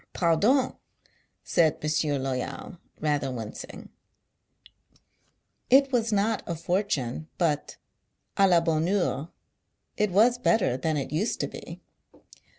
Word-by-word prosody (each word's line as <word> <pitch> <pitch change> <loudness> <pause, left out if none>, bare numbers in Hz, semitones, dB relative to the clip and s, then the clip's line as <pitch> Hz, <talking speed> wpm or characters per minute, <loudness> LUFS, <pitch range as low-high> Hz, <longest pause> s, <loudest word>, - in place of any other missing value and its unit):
Pardon! 205 - +2 0.7
said 160 -4 +2
Mon 155 - -4
sieur 150 -1 +1
Loyal, 135 +6 -4 0.2
rather 145 -3 0
wincing. 115 -4 -8 1.8
It 270 +1 +5
was 230 -3 +1
not 210 +1 +1
a 170 - -2
for 175 +4 0
tune, 155 - -3
but 155 -5 -1 0.2
— - - -50
& - - -21
la 185 -4 +5
bonne 165 -1 0
heure 175 -5 0 0.3
— - - -49
it 210 - +2
was 230 +6 +4
better 220 - +2
than 155 +4 -1
it 140 - -4
used 175 +9 -1
to - - -1
be - - -10
170 Hz, 135 wpm, -27 LUFS, 150-210 Hz, 1.8 s, It